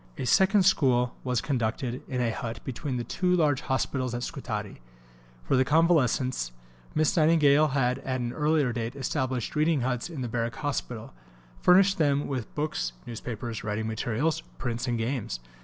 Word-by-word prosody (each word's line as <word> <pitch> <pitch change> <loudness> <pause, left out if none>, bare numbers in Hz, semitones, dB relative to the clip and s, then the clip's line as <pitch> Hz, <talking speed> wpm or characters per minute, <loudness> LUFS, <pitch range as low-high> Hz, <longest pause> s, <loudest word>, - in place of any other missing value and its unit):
A 135 - -3
second 190 - +4
school 125 -9 +3
was 125 -3 0
conducted 120 -1 -2
in 125 -2 -2
a 115 -2 +1
hut 115 0 -5
between 130 +1 -3
the 120 - -2
two 180 +9 +1
large 150 -6 +2
hospitals 130 -2 -1
at 120 - -3
Scutari. 110 - -5 0.6
For - - +1
the 130 - +4
convalescents, 130 - +2 0.4
Miss 155 +6 +2
Nightingale 155 -2 +5
had 130 -3 +1
at 130 -1 -3
an 120 0 -3
earlier 150 -4 +2
date 115 +2 -3
established 130 -2 -2
reading 155 -1 +2
huts 125 +3 -1
in 155 -6 -6
the 125 - -2
Barrack 115 +2 -2
Hospital, 125 -6 -4 0.5
furnishing 195 +1 +5
them 145 -2 +2
with 130 -5 -4
books, 150 - -2
newspapers, 115 -1 -5
writing 105 +1 -2
materials, 115 +7 -1 0.2
prints, 120 - -3
and 120 -1 0
games. 115 - -2
130 Hz, 160 wpm, -27 LUFS, 120-150 Hz, 0.6 s, Nightingale